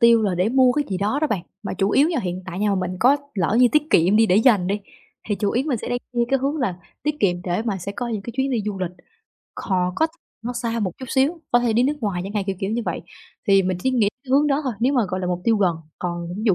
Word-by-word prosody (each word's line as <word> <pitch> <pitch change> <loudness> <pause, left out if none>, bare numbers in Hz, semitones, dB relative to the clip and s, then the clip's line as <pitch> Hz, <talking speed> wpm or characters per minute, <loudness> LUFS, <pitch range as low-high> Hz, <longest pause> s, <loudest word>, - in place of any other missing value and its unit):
tiêu 235 -1 +6
là 200 -4 +1
để 180 +4 +1
mua 255 +1 +4
cái 295 +2 0
gì 190 - -1
đó 210 +8 0
đó 310 - +2
bạn, 205 - -2 0.2
mà 200 - -4
chủ 195 +1 +1
yếu 280 +8 +4
nha 335 -4 0
hiện 180 0 -4
tại 185 -1 -5
nha 210 +1 +1
mà - - +2
mình 185 -1 -2
có 265 +4 +5 0.2
lỡ 195 +2 +1
như 250 - +7
tiết 300 - +4
kiệm 180 - +4
đi 225 +1 +5
để 185 - +3
dành 215 -5 +4
đi, 200 +2 -1 0.5
thì 210 - +1
chủ 200 0 -1
yếu 250 +3 0
mình 265 -7 0
sẽ - - -6
đem 245 - 0
như 240 -1 +2
cái 270 - +2
hướng 275 +4 -1
là 250 - -1 0.3
tiết 300 +1 -2
kiệm 175 -3 +1
để 180 +3 -1
mà 215 -4 -2
sẽ 195 +3 -5
có 240 +4 -4
những 220 -4 -3
cái 235 - -6
chuyến 270 +1 +1
đi 235 -4 0
du 205 -2 -3
lịch, 185 -2 -2 0.6
khò 180 -2 -1
có 320 - +3 0.4
nó 245 - -2
xa 235 -1 -2
một 190 -4 -1
chút 260 - -6
xíu, 280 +7 +1
có 240 - +6
thể 240 -2 +1
đi 230 +2 +3
nước 285 +4 +1
ngoài 200 -6 -1
chẳng 195 - -6
hạn, 205 -2 0
kiểu 195 -1 -2
kiểu 195 - -1
như 235 +2 -1
vậy. - - -2 0.5
Thì 195 -1 +6
mình 185 -1 -1
chỉ 260 - +2
nghĩ 235 -6 +3 0.2
cái 260 - -10
hướng 285 +3 +4
đó 285 0 +2
thôi 260 - -1
nếu 255 +4 +3
mà, 255 -4 +3
gọi 185 +1 -2
là, 180 - -2
mục 180 0 -1
tiêu 225 -1 +3
gần. 185 -5 +2 0.2
Còn 175 -1 -3
ví 210 - -5
dụ 200 - +5
215 Hz, 310 wpm, -22 LUFS, 190-255 Hz, 0.6 s, như